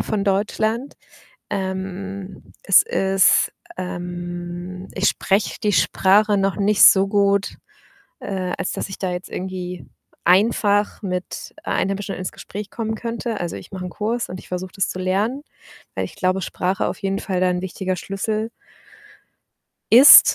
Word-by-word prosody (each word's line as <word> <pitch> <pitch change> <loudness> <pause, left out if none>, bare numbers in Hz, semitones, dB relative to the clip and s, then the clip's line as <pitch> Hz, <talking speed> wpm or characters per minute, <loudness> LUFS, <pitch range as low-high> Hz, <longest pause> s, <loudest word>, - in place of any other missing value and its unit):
von 205 -2 -1
Deutschland. 215 +5 0 0.6
Ähm, 190 0 -5
es 195 - +6
ist, 190 0 +3 0.3
ähm, 175 0 -6
ich 195 - +2
spreche 195 +2 0
die 210 -2 +2
Sprache 205 +2 +3
noch 195 -1 +1
nicht 205 0 +3
so 195 0 +7
gut, 200 0 +1 0.6
äh, 185 -2 -3
als - - -2
dass - - -4
ich 195 - -7
da 185 -2 -2
jetzt 180 +1 -6
irgendwie 180 -1 -5 0.4
einfach 205 +2 +3
mit 180 -2 -5
Einheimischen 195 +1 -1
ins 185 - -4
Gespräch 205 +1 -8
kommen 220 -1 -3
könnte. 230 0 -4
Also, 175 -1 -3
ich - - -11
mache 185 -1 -5
'n 180 - -6
Kurs 230 +5 -2
und 185 - -6
ich - - -16
versuche 180 0 -5
das 195 - 0
zu 185 - -5
lernen, 205 +9 0 0.5
weil - - -1
ich - - -9
glaube, 185 +1 0
Sprache 185 +3 -1
auf - - -4
jeden 195 0 -1
Fall 185 -3 -2
da 185 - +3
'n 180 0 -2
wichtiger 185 0 -3
Schlüssel 215 +4 -3 1.4
ist. 260 +5 +10
195 Hz, 150 wpm, -21 LUFS, 185-205 Hz, 1.4 s, ist